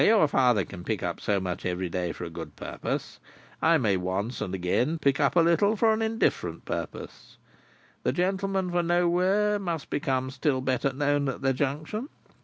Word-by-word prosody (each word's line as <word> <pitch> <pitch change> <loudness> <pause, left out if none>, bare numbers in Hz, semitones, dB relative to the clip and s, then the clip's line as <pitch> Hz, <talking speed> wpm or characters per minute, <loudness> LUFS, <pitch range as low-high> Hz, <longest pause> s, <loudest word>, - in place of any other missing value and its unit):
Where - - +5
your 215 -8 +5
father 125 -8 +3
can 90 - -9
pick 110 +1 -2
up 85 -1 -2
so 100 -2 +1
much 90 -2 -4
every 90 0 -1
day 90 0 -2
for - - -7
a 85 - -6
good - - -8
purpose, - - -4 0.4
I 165 +1 +5
may 105 -9 +2
once 95 +6 -2
and 95 -1 -2
again 120 - 0
pick 140 -3 +1
up - - +2
a 170 - +6
little 170 +6 +3
for 220 +1 +4
an 220 - -1
indifferent 225 +1 0
purpose. - - -6 0.6
The - - +1
gentleman 190 0 0
for 175 0 +2
Nowhere 180 +4 +2
must 170 -6 -4
become 130 -2 -1
still 135 0 0
better 130 +1 0
known 145 +1 +1
at 135 - -5
the 135 0 +3
Junction. 155 - -2
140 Hz, 190 wpm, -27 LUFS, 105-180 Hz, 0.6 s, a